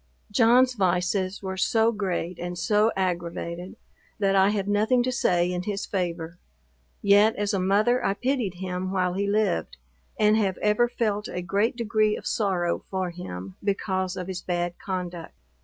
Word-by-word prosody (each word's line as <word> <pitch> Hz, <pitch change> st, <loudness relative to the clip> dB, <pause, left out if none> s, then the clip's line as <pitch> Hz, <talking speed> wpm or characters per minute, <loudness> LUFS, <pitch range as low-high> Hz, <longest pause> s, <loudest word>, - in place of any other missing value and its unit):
John's 250 Hz, +3 st, +5 dB
vices 185 Hz, -1 st, 0 dB
were 190 Hz, 0 st, -4 dB
so 225 Hz, +4 st, +3 dB
great 185 Hz, -5 st, -3 dB
and 175 Hz, 0 st, -5 dB
so 210 Hz, +5 st, +2 dB
aggravated, 175 Hz, -1 st, -3 dB, 0.4 s
that 195 Hz, -2 st, +2 dB
I 190 Hz, +1 st, +5 dB
have 205 Hz, -2 st, -1 dB
nothing 220 Hz, +5 st, +2 dB
to 255 Hz, -, 0 dB
say 180 Hz, -8 st, +1 dB
in 180 Hz, 0 st, -2 dB
his 200 Hz, +2 st, -3 dB
favor: 175 Hz, -2 st, -3 dB, 0.6 s
yet, 205 Hz, +2 st, +5 dB
as 205 Hz, +1 st, -1 dB
a 195 Hz, -, +1 dB
mother, 215 Hz, +7 st, +2 dB
I 195 Hz, -, +1 dB
pitied 245 Hz, -6 st, -1 dB
him 185 Hz, 0 st, -4 dB
while 185 Hz, -2 st, 0 dB
he 200 Hz, +2 st, -1 dB
lived, 205 Hz, -, 0 dB, 0.4 s
and 210 Hz, 0 st, +4 dB
have 195 Hz, -4 st, 0 dB
ever 210 Hz, +3 st, +2 dB
felt 210 Hz, -3 st, -1 dB
a 180 Hz, -, -5 dB
great 200 Hz, +8 st, +1 dB
degree 215 Hz, -2 st, +1 dB
of -, -, -11 dB
sorrow 180 Hz, -5 st, 0 dB
for 185 Hz, -2 st, -2 dB
him, 95 Hz, -, -8 dB
because 190 Hz, -2 st, -1 dB
of 180 Hz, -, -4 dB
his 185 Hz, 0 st, -5 dB
bad 175 Hz, -1 st, -2 dB
conduct. 180 Hz, -3 st, -5 dB
195 Hz, 165 wpm, -26 LUFS, 180-210 Hz, 0.6 s, John's